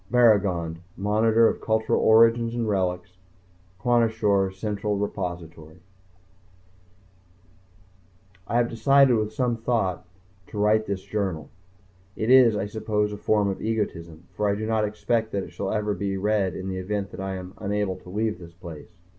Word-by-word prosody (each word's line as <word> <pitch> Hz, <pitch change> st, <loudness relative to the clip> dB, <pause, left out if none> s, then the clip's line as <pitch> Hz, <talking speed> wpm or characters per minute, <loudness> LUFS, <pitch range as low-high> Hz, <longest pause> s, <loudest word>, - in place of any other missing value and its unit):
BARRAGOND 100 Hz, -9 st, +3 dB, 0.2 s
Monitor 110 Hz, +3 st, +3 dB
of -, -, -2 dB
Cultural 110 Hz, 0 st, +1 dB
Origins 115 Hz, +1 st, +4 dB
and 115 Hz, -2 st, -1 dB
Relics 90 Hz, -2 st, -2 dB, 0.6 s
Kwashior 110 Hz, -5 st, +2 dB
Central 105 Hz, +1 st, -3 dB
Repository 85 Hz, -5 st, -5 dB, 2.7 s
I 120 Hz, -, 0 dB
have 120 Hz, -1 st, +3 dB
decided 135 Hz, +3 st, +4 dB
after 110 Hz, -1 st, 0 dB
some 120 Hz, +1 st, -1 dB
thought, 105 Hz, -7 st, -1 dB, 0.4 s
to -, -, -9 dB
write 105 Hz, +1 st, +2 dB
this 95 Hz, -2 st, -3 dB
journal. 95 Hz, -7 st, -3 dB, 0.6 s
It 110 Hz, +3 st, 0 dB
is, 125 Hz, -4 st, +7 dB
I 105 Hz, -, -1 dB
suppose, 105 Hz, 0 st, -2 dB
a -, -, -6 dB
form 105 Hz, 0 st, +1 dB
of 95 Hz, -, -3 dB
egotism 85 Hz, -7 st, -3 dB
for 105 Hz, -1 st, -1 dB
I 100 Hz, -, +1 dB
do 110 Hz, +1 st, -4 dB
not 110 Hz, -1 st, +1 dB
expect 110 Hz, +2 st, -1 dB
that 100 Hz, -1 st, -1 dB
it -, -, -10 dB
shall 100 Hz, -1 st, -4 dB
ever 105 Hz, -1 st, -1 dB
be 100 Hz, 0 st, -3 dB
read 100 Hz, -1 st, 0 dB
in 95 Hz, -, -6 dB
the 95 Hz, -1 st, -3 dB
event 100 Hz, 0 st, -3 dB
that -, -, -9 dB
I 95 Hz, 0 st, -3 dB
am 90 Hz, 0 st, -8 dB
unable 105 Hz, -2 st, -2 dB
to 90 Hz, -, -14 dB
leave 105 Hz, 0 st, -2 dB
this 85 Hz, -1 st, -12 dB
place. 85 Hz, -4 st, -10 dB
105 Hz, 155 wpm, -25 LUFS, 95-110 Hz, 2.7 s, is